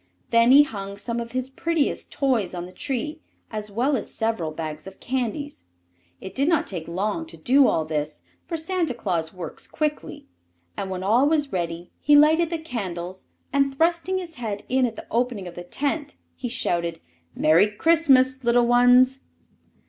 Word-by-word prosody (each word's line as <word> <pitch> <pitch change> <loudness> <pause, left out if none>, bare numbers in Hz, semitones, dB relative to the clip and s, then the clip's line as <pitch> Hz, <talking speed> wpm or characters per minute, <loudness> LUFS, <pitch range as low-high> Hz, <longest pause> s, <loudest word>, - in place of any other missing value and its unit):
Then 230 +1 +5
he 280 +3 +9
hung 200 -6 -6
some 235 +3 -3
of 235 0 -6
his 255 +1 -2
prettiest 330 +1 -1
toys 235 -10 0
on 175 0 -4
the 180 - -11
tree, 280 - -4 0.3
as 210 -1 -4
well 250 +8 +1
as 235 - -4
several 220 -8 -1
bags 155 +1 -6
of 195 - -11
candies. 265 - -3 0.5
It 190 - -8
did 275 +4 +1
not 330 -3 +2
take 170 -5 -5
long 210 - -2
to - - -10
do 270 +2 +4
all 160 - +1
this, 150 -1 -3 0.2
for 335 -1 -2
Santa 325 -4 -1
Claus 175 -8 -2
works 175 -4 -8
quickly, 300 -1 -3 0.5
and 195 - -4
when 185 -1 -4
all 240 +8 +4
was 295 -3 0
ready 170 -1 -3
he 295 - +4
lighted 315 +3 +5
the 335 - -2
candles 190 - -6 0.3
and, 275 -1 +1
thrusting 340 +3 +1
his 345 -5 -7
head 210 -3 -3
in 255 0 +2
at 225 - -7
the - - -9
opening 235 -5 -1
of 175 - -8
the 175 - -8
tent, 290 - -3 0.2
he 245 - -5
shouted: 170 -8 -1 0.4
"Merry 160 +6 +5
Christmas, 265 0 +3
little 240 0 +4
ones!" 245 +2 +5
245 Hz, 175 wpm, -24 LUFS, 190-290 Hz, 0.5 s, he